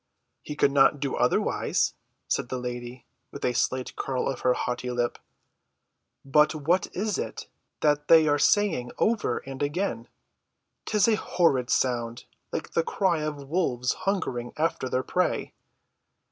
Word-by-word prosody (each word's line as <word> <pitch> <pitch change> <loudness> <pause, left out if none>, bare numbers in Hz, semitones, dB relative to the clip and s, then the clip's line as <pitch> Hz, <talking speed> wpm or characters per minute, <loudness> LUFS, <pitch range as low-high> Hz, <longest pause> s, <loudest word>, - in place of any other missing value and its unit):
"He 150 - -7
could 140 - +3
not 140 +1 +4
do 140 -1 -2
otherwise," - - +1 0.3
said - - -1
the 130 - -2
lady, 125 0 -6 0.2
with - - -6
a 125 - +1
slight 130 +1 -1
curl 130 -2 -2
of 135 - -2
her 125 0 +2
haughty 125 0 -3
lip. 120 -1 -1 1.1
"But 150 +3 +4
what 165 +5 +1
is 205 +2 -1
it - - -5 0.4
that 150 0 +2
they 160 -1 +7
are 145 0 +2
saying 160 -9 +2
over 225 -1 +1
and 135 0 -7
again? 145 - -2 0.8
'Tis 210 -1 +2
a 220 -2 +3
horrid 135 - +1
sound, 120 -2 0 0.3
like 160 - -4
the 165 - +2
cry 175 0 0
of 150 -2 -4
wolves 135 -7 0
hungering 130 -12 -2
after 155 -4 -1
their 130 +1 0
prey." 180 +6 -1
140 Hz, 145 wpm, -26 LUFS, 125-165 Hz, 1.1 s, they